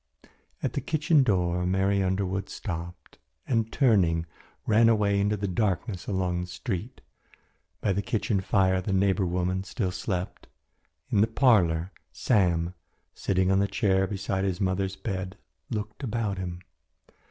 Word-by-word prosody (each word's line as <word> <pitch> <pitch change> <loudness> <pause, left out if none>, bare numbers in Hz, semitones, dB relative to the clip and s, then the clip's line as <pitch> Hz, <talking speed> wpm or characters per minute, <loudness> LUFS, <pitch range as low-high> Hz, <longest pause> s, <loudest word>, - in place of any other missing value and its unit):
At - - -1
the - - -2
kitchen 155 0 +3
door 90 -7 +1
Mary 95 +2 +1
Underwood 95 0 -1
stopped, 85 -3 -7 0.3
and, 115 -2 0
turning, 95 - +3 0.4
ran 115 +1 +5
away 105 -3 +2
into 105 +1 +1
the 100 0 -2
darkness 95 0 -1
along 90 -2 -1
the 90 - -5
street. 100 +5 -5 0.8
By 100 - +1
the 100 - 0
kitchen 110 -3 -1
fire 95 -1 +2
the 95 +1 -2
neighbour 95 0 +2
woman 90 +2 -1
still 95 -1 -2
slept. 90 -1 -4 0.6
In 100 - +4
the 110 - +4
parlour 95 -9 +3 0.2
Sam, 90 -6 +1 0.4
sitting 95 -1 +1
on 95 - +3
the 100 - +2
chair 95 -2 +1
beside 95 -1 -2
his 95 -2 -1
mother's 95 0 0
bed, 95 -2 -4 0.3
looked 105 +2 -4
about 110 -6 -2
him. 90 -1 -5
95 Hz, 140 wpm, -27 LUFS, 90-105 Hz, 0.8 s, ran